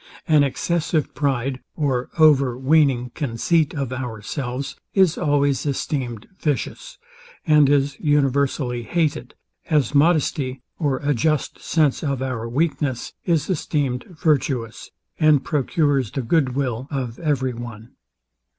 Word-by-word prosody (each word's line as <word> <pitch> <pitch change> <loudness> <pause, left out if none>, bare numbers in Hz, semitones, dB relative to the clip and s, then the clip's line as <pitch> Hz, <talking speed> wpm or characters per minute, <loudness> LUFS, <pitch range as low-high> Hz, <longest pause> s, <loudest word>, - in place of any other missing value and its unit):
An 155 -3 +5
excessive 155 +2 -1
pride 135 -2 -1 0.2
or 130 -5 -1
overweaning 135 -3 +4
conceit 150 +4 0
of 135 -3 -3
ourselves 125 +2 -4 0.2
is 190 -5 +4
always 145 -2 +1
esteemed 130 -5 -3
vicious, - - -3 0.5
and 150 -3 +5
is 140 0 +1
universally 140 -4 +1
hated; 155 +5 -1 0.3
as 150 -5 +2
modesty, 140 -4 +2 0.2
or 145 -5 +1
a 145 0 +2
just 155 +3 0
sense 155 -5 +1
of 140 -4 -1
our 125 -3 -3
weakness, 140 -2 -1
is 165 -4 +1
esteemed 145 -7 -1
virtuous, 140 - -1 0.3
and 155 -4 +4
procures 145 - +1
the 135 - -4
good 130 0 +1
will 130 -2 -2
of 130 -5 -4
every 135 -6 0
one. 115 -1 -9
140 Hz, 115 wpm, -22 LUFS, 125-155 Hz, 0.5 s, An